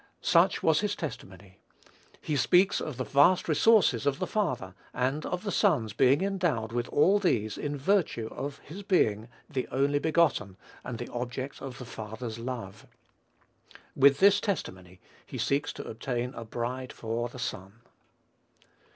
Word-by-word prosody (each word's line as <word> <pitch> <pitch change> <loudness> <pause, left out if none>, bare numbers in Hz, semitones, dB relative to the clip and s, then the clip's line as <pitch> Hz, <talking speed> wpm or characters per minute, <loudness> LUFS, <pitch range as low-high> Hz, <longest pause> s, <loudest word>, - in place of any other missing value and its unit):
Such - - +3
was 160 -1 +4
his 205 -1 -1
testimony. 100 - -8 0.6
He 155 - -3
speaks 180 +8 +3
of 150 -6 -5
the 130 - -2
vast 145 +8 +4
resources 160 - +4
of 140 -1 +1
the 185 - -2
father, 175 - -2 0.2
and 135 +5 -1
of 180 +2 -3
the 205 - -2
son's 140 - +2
being 130 +7 +4
endowed 175 - -1
with 120 +1 -2
all 190 +8 +4
these 110 - 0
in 145 0 -4
virtue 150 - +1
of 140 0 -5
his 175 +8 -8
being 115 - +1 0.2
"the 135 -5 -3
only 140 +2 +1
begotten," 150 - +1 0.3
and 125 -2 -5
the 120 - -7
object 125 +3 -5
of 135 -2 -7
the 125 - -8
father's 110 0 -7
love. 115 -5 -6 1.1
With 140 0 +5
this 200 +4 +5
testimony 95 - -4 0.2
he - - -8
seeks 140 +1 0
to - - -8
obtain 120 +2 -3
a 115 - -7
bride 125 +3 -4
for 115 +1 -3
the 125 - -11
son. 105 -2 -6
130 Hz, 155 wpm, -28 LUFS, 115-160 Hz, 1.1 s, With